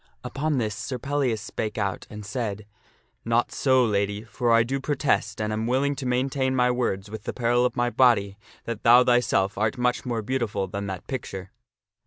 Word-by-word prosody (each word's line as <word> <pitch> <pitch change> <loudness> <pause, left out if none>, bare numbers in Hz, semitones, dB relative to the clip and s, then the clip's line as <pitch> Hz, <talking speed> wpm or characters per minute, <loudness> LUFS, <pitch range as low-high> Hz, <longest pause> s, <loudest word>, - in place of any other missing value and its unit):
Upon 150 +1 -1
this 110 -4 -1
Sir 130 +5 -4
Pellias 135 -4 -1
spake 110 +2 -4
out 100 -2 -2
and 105 -2 -8
said, 105 -2 -4 0.3
" - - -38 0.2
Not 115 +1 +1
so, 130 -2 +3
Lady; 100 -1 -1
for 115 +2 -1
I 115 0 +6
do 135 +4 -2
pro 145 +2 -1
test, 110 -6 0
and 110 0 -1
am 110 +1 -2
willing 140 +3 +1
to 130 -1 -4
maintain 130 +1 0
my 125 -1 +3
words 105 -5 -2
with 110 -1 -7
the - - -3
peril 120 0 +2
of - - -9
my 120 -1 +1
body, 105 -6 +3 0.2
that 115 -2 -5
thou 120 +2 +7
thyself 110 -6 +2
art 110 +5 0
much 125 0 0
more 115 -3 -2
beautiful 115 -5 -1
than 100 +1 -5
that 95 -2 -6
picture." 95 -7 -6
115 Hz, 200 wpm, -25 LUFS, 105-130 Hz, 0.3 s, thou